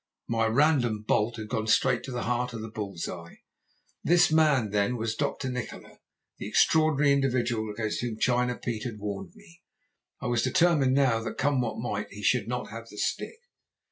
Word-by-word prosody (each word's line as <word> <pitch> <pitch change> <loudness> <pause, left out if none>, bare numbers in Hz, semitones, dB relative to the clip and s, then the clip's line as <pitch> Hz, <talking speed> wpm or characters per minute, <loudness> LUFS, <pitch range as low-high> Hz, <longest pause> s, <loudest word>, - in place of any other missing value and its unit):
My 115 -1 +1
random 120 -4 +2
bolt 110 +3 +1
had 110 -1 -7
gone 110 -2 -2
straight 120 +2 +3
to 130 - -7
the 120 -1 -3
heart 125 +1 -1
of 115 - -5
the 110 - -7
bulls 100 -6 -5
eye. 85 -2 -9 0.6
This 175 -1 +4
man 150 -9 +3
then 105 +4 +1
was 110 -1 -2
Dr. 140 -1 -2
Nikola, 125 -2 -6 0.4
the - - -5
extraordinary 155 -3 +3
individual 120 -5 0
against 110 0 -3
whom 120 -3 -3
China 125 +1 +1
Pete 115 -1 -4
had 115 -4 -5
warned 100 - -6
me. 195 -5 -18 0.6
I - - -7
was 120 -1 +1
determined 135 0 +3
now 130 -5 +3
that, 115 -1 -5
come 140 -1 +1
what 120 -3 -3
might, - - -3
he - - -9
should - - +2
not - - -4
have - - -8
the - - -12
stick. - - -2
120 Hz, 185 wpm, -27 LUFS, 110-140 Hz, 0.6 s, This